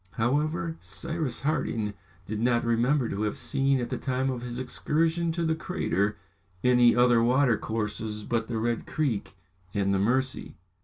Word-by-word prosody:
However, 155 - 0
Cyrus 160 -5 -4
Harding 115 -8 -1 0.3
did 105 0 -4
not 120 0 +2
remember 120 +3 +2
to 100 - -3
have 105 -1 -1
seen, 135 -1 +1
at 120 - -3
the - - -2
time 130 0 0
of 125 -2 -4
his 120 0 -5
excursion 160 +6 0
to 170 0 -1
the 160 - +2
crater, 105 - -1 0.5
any 125 -1 +5
other 120 -1 +5
watercourses 110 -4 0
but 115 0 -1
the 115 - -2
Red 115 +1 -1
Creek 130 -12 -1 0.4
and 100 -1 +2
the 95 - +2
Mercy. 130 +6 0
125 Hz, 155 wpm, -27 LUFS, 110-145 Hz, 0.5 s, any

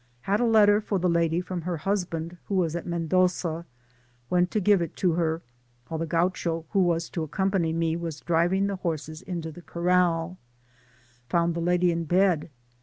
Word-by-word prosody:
— 120 - -31
^^Had 200 +2 +2
a 245 - +2
letter 210 -2 +5
for 205 -1 -1
the 180 0 +1
lady 170 0 +2
from 180 -1 -5
her 175 0 -3
husband 175 -2 -2
who 200 - -2
was 170 -3 +1
at 175 - -4
Mendoza 170 0 0 0.3
— 120 0 -36
went 180 0 +3
to 215 - 0
give 200 -1 +4
it 170 - -4
to 180 - +1
her 165 -1 -1 0.5
while 160 - -3
the 165 - -2
Gaucho, 165 -1 0
who 200 - +2
was 170 -2 +2
to 160 -3 -3
accom 190 +6 0
pany 170 -5 +1
me, 165 0 0
was 165 -3 -5
driving 175 +4 +2
the 200 -1 -2
horses 160 -3 -4
into 170 -3 -5
the 175 - -12
corral 175 0 +1 0.9
found 170 -1 +2
the 170 - -3
lady 175 +1 +2
in 165 0 -2
bed. 175 -1 +2
170 Hz, 195 wpm, -26 LUFS, 165-185 Hz, 0.9 s, letter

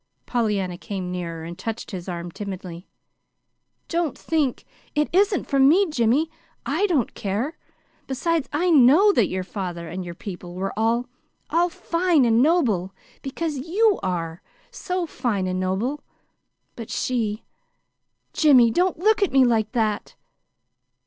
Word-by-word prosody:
Pollyanna 200 -7 -1
came 190 -4 -5
nearer, 170 -2 -5
and 170 +1 -7
touched 225 +3 -5
his 185 -2 -6
arm 175 0 -5
timidly. 185 -2 -7 1.0
"Don't 335 -4 -1
think 300 -6 -1 0.3
It 300 0 +2
isn't 395 0 +3
for 275 - 0
me, 325 +9 +5
Jimmy. 275 +4 +2 0.3
I 410 - +1
don't 295 - 0
care. 215 - -3 0.5
Besides, 310 +3 -1
I 345 +4 +1
KNOW 305 +8 +6
that 220 - +3
your 185 0 -3
father 180 -3 -5
and 185 +3 -5
your 175 -1 -7
people 175 -2 -8
were 190 +1 -3
all 230 +3 +1 0.5
all 345 +2 +3
fine 335 -4 +1
and 230 0 +4
noble, 225 - +2 0.3
because 295 +1 -3
YOU 390 +8 +2
are 170 -3 -3 0.3
so 365 -1 -3
fine 235 - -2
and 185 0 -2
noble. 200 +11 -2 0.7
But 230 -2 -8
she 225 -4 -2 0.9
Jimmy, 255 -7 +5
don't 360 +7 +1
look 425 +5 +2
at 400 - +2
me 265 -1 +5
like 220 -3 +1
that!" 215 -4 -1
235 Hz, 140 wpm, -23 LUFS, -, 1.0 s, KNOW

